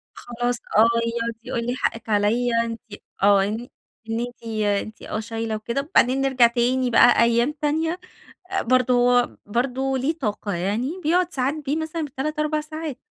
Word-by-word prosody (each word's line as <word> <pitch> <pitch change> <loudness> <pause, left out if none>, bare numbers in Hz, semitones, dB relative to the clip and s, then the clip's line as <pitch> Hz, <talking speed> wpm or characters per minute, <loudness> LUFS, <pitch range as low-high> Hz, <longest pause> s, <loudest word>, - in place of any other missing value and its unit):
خلاص، 245 0 -2 0.2
آه، 220 - +7 0.3
يقعد 235 0 -2
يقول 235 -2 -3
لي: 245 - -1
"حقِك 230 -3 -3
عليَّ 220 +4 +2
أنتِ 230 -1 -5 0.4
آه، 200 -1 +5
إن 220 +5 -3 0.4
إن 225 - -1
أنتِ 245 0 -6 0.4
أنتِ 215 - -12
آه، 215 - -4
شايله 225 0 -3
وكده." 235 +5 -2
وبعدين 260 +2 +4
نرجع 265 -3 +4
تاني 250 +2 +1
بقى 240 0 +6
أيام 235 +4 +2
تانية، 320 +4 0 0.6
برضه 245 0 +3 0.2
برضه 260 +4 -1
ليه 300 +6 -1
طاقة 210 - -3
يعني 220 - -2
بيقعد 355 +3 +1
ساعات 265 +2 0
بيه 280 - 0
مثلًا 320 0 -3
ب3، 295 +3 -4
4 305 0 0
ساعات 310 -2 -6
245 Hz, 155 wpm, -23 LUFS, 230-275 Hz, 0.6 s, آه